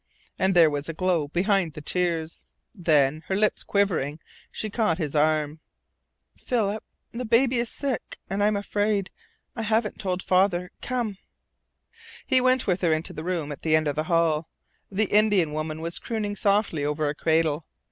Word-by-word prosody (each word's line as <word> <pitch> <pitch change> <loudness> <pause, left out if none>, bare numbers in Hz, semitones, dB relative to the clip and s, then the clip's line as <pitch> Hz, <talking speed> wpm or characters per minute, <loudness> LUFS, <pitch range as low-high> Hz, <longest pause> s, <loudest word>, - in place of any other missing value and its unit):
And 190 0 +2
there 165 -3 +6
was 145 +2 -3
a 165 - -4
glow 175 -4 +1
behind 180 +1 +1
the - - -7
tears. 165 0 -1 0.3
Then, 155 -6 +2
her 190 - 0
lip 210 +1 +3
quivering, 165 -7 +1 0.3
she 215 - -4
caught 210 -8 +1
his 155 -5 -3
arm. 155 0 +1 0.8
"Philip, 220 -3 -1 0.3
the 240 +2 -4
baby 245 +2 +3
is 235 -1 0
sick 275 -4 -3
and 200 +1 -1
I - - +5
am 210 - +1
afraid. 205 -1 0 0.4
I 230 - -3
haven't 220 0 0
told 185 -2 -2
father. 180 -1 +2
Come!" 235 -6 -2 1.1
He 260 -2 +3
went 255 0 +3
with 185 -1 0
her 160 -3 +3
to 160 - -6
the 155 - -6
room 170 -4 -2
at 140 - -7
the 155 -1 +3
end 155 -1 +2
of 145 - -1
the 155 +1 -1
hall. 165 -2 +1 0.4
The 210 +3 +1
Indian 205 -7 +4
woman 155 +1 -3
was 170 +1 -3
crooning 210 -3 -3
softly 200 -7 +1
over 150 +1 0
a 145 - 0
cradle. 160 0 +1
180 Hz, 175 wpm, -25 LUFS, 155-210 Hz, 1.1 s, there